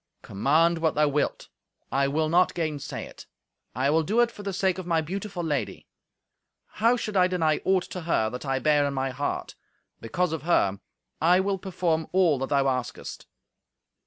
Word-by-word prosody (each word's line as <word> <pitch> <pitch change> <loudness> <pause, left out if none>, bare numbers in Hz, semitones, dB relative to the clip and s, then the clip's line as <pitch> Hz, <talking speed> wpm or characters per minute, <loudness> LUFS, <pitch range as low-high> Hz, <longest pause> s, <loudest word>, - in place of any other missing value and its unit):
"Command 160 +11 +2
what 160 -1 +1
thou 150 0 +3
wilt, 145 +1 -1 0.4
I 135 +1 +2
will 155 +3 0
not 175 +3 +3
gainsay 155 -4 -3
it. - - -13 0.5
I 135 +3 +1
will 160 +1 +3
do 210 +9 0
it 240 -1 +2
for 210 - -11
the 200 -1 -3
sake 190 0 0
of 180 - -7
my 165 -2 +2
beautiful 185 +3 -4
lady. 145 -9 -3 0.8
How 230 +3 +1
should 215 -3 -4
I 180 -1 +5
deny 165 -4 +1
aught 190 -1 +3
to 180 - -5
her 160 -9 +1
that 125 - -6
I 135 -2 -1
bear 145 +1 +3
in 140 - -3
my 135 0 -1
heart? 140 +3 -3 0.5
Because 170 +9 -1
of 160 - -3
her, 100 - +1 0.4
I 175 +3 +5
will 195 0 0
perform 175 -4 -1
all 175 -7 +3
that 135 - -3
thou 140 -1 +2
askest." 130 -2 -4
160 Hz, 185 wpm, -26 LUFS, 140-185 Hz, 0.8 s, I